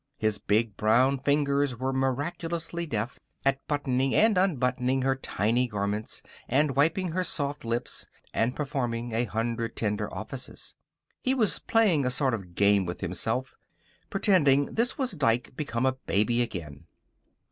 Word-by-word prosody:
His 110 -1 0
big 110 0 +1
brown 130 +5 +3
fingers 140 -1 +1
were 130 +2 -1
miraculously 165 +6 -2
deft 115 -1 -3 0.3
at 135 0 +3
buttoning 135 -2 0
and 220 -1 +5
unbuttoning 130 -7 +1
her 135 0 +2
tiny 120 0 0
garments, 105 0 -3 0.2
and 140 +2 +2
wiping 165 +6 +2
her 185 +3 0
soft 145 -3 -2
lips, 120 +1 -3 0.3
and 115 +3 +1
performing 120 -5 -2
a 115 +2 +1
hundred 115 +1 -2
tender 105 -2 -2
offices. - - -7 0.5
He 260 +1 +1
was 220 -6 +3
playing 205 -10 +3
a - - +2
sort 130 0 +1
of 90 -6 -6
game 100 -2 +3
with 90 - -5
himself, 110 +8 -2 0.6
pretending 145 -9 +3
this 235 +2 0
was 260 -4 -1
Dike 125 -6 0
become 130 -4 -2
a 130 - +4
baby 120 -2 0
again. 85 - -5
130 Hz, 145 wpm, -28 LUFS, 115-145 Hz, 0.6 s, and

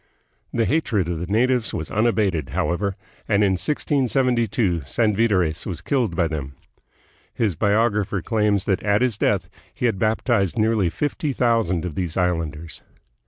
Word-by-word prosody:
The 115 -1 +1
hatred 115 - 0
of 85 -2 -3
the 85 - -4
natives 120 +3 +1
was 80 - -5
unabated, 105 - +1
however, 95 +3 -1 0.3
and 105 -1 +3
in 100 - +3
1672 120 - 0
Sanvitores 100 - +1
was 85 -3 -5
killed 110 -2 0
by 85 -1 +2
them. 70 -4 -5 0.8
His 105 -7 0
biographer 105 0 +1
claims 105 -3 +1
that 100 -1 0
at 105 +3 +2
his 125 -4 +1
death 95 -3 0 0.2
he 125 - -3
had 110 -5 +1
baptized 110 -1 +1
nearly 110 -4 +2
fifty 145 - -2
thousand 115 -9 +1
of 90 - -4
these 85 +1 -3
islanders. 85 -4 -2
100 Hz, 145 wpm, -22 LUFS, 90-115 Hz, 0.8 s, and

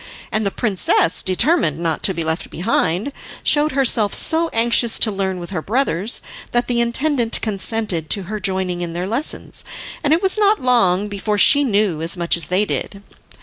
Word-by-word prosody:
And 215 - 0
the 200 - 0
princess, 195 -6 0
determined 190 - +1
not 165 -2 -2
to 190 - +2
be 170 - -1
left 160 +1 -3
behind, 190 - -1 0.3
showed 300 0 +2
herself 230 -6 +1
so 325 +1 +1
anxious 235 0 +2
to 220 - +2
learn 190 -2 -3
with 175 +1 -8
her 180 -5 -3
brothers, 220 - 0 0.3
that 240 0 +1
the 240 -1 0
intendant 235 0 +1
consented 205 -5 0
to 200 - +1
her 210 +4 -5
joining 185 -2 -2
in 170 -1 -4
their 175 +2 -3
lessons, 235 +10 -3 0.4
and 290 - +1
it 330 +4 +2
was 385 +2 +1
not 420 0 +3
long 210 -6 +2
before 205 +1 -2
she 285 +7 +5
knew 205 - 0
as 165 +3 -2
much 170 -1 +1
as 170 -3 -2
they 190 +4 +3
did. 200 -1 -4
210 Hz, 185 wpm, -19 LUFS, 180-245 Hz, 0.4 s, she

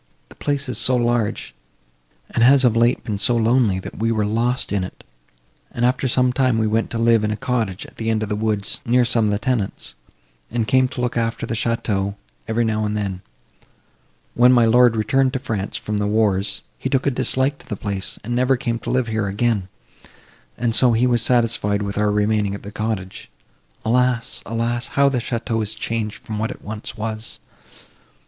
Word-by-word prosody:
The - - -15
place 140 -1 -1
is 125 - -1
so 130 - +3
large, 120 -3 0 0.8
and 115 - +2
has 135 +2 +6
of 115 -2 +3
late 120 +2 +2
been 105 -3 -3
so 120 +3 +3
lonely, 115 -3 +3
that 95 - -8
we 115 +1 +1
were 110 -2 +1
lost 120 +4 0
in 100 -2 0
it, 90 - -9 0.7
and, 120 - 0
after 130 +1 +1
some 125 0 +2
time, 130 -3 +2
we 110 - +1
went 110 +1 0
to 115 - -3
live 115 -1 +3
in 105 - 0
a 105 - -2
cottage 110 -5 -2
at - - -16
the 115 0 -2
end 110 -1 +1
of 105 - -4
the 105 - 0
woods, 105 -1 -2
near 125 +1 +3
some 115 -2 +2
of 105 - +1
the 105 - +1
tenants, 110 - -2 0.6
and 115 -1 -1
came 130 +4 +4
to 125 - -6
look 125 -1 -1
after 115 0 -1
the - - -4
château, 105 -4 -1 0.3
every 115 +1 +1
now 110 -1 0
and 105 0 -1
then. 95 -3 -3 1.1
When 125 +1 +5
my 120 -2 +5
lord 120 +1 +5
returned 130 +5 +1
to 130 - -1
France 110 -6 -3
from 105 -1 -3
the 105 - 0
wars, 105 -2 0 0.2
he 130 - -2
took 135 0 +1
a 140 - +3
dislike 130 +2 +1
to - - -17
the 105 - -2
place, 100 -1 -3
and 120 +3 -3
never 130 +1 +2
came 120 -3 -2
to - - -6
live 130 -1 +1
here 110 -2 -1
again, 105 -1 0 0.9
and 115 0 0
so 120 +1 +5
he 115 +3 +3
was 120 -2 +3
satisfied 115 -4 +2
with 100 0 -3
our 105 0 +2
remaining 105 -1 +1
at - - -10
the 100 - -8
cottage. 110 -3 -4 0.6
Alas—alas! 120 0 0
how 140 0 +3
the 130 -2 0
château 115 -1 -2
is 110 0 -3
changed 110 -1 -3
from 110 -1 -4
what 110 +2 -1
it - - -9
once 110 +1 -7
was! 110 0 -5
115 Hz, 205 wpm, -21 LUFS, 105-125 Hz, 1.1 s, has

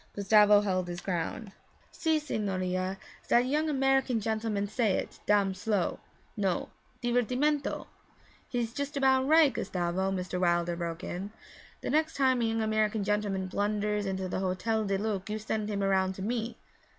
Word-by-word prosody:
Gustavo 205 0 +5
held 185 -3 -1
his 175 0 -5
ground. 185 +4 -3 0.4
'Si, 320 -1 +1
signorina, 190 -8 -2 0.3
zat 240 - +6
yong 300 +4 +1
American 270 -3 +2
gentleman 220 -1 -1
say 215 -1 +1
it - - -3
dam 200 -2 +3
slow, 195 -1 -1 0.4
no 195 -4 -1 0.3
divertimento.' 250 +5 0 0.6
'He's 235 -2 -2
just 285 +2 -3
about 265 -1 +3
right, 310 -2 +6
Gustavo,' 180 +1 -1
Mr. 180 -1 -3
Wilder 175 -1 +1
broke 170 -1 -4
in. 190 +3 -4 0.5
'The - - -3
next 315 +2 +1
time 260 -3 +3
a - - +2
young 225 0 0
American 215 -1 +1
gentleman 205 -2 0
blunders 205 +1 -1
into 190 -1 -2
the 185 - -2
Hotel 195 +4 0
du 195 -1 0
Lac 205 -1 -2
you 215 - -2
send 215 0 -3
him 200 -1 -1
around 190 -1 +2
to 190 - -6
me.' 235 +2 -2
210 Hz, 155 wpm, -29 LUFS, 190-240 Hz, 0.6 s, zat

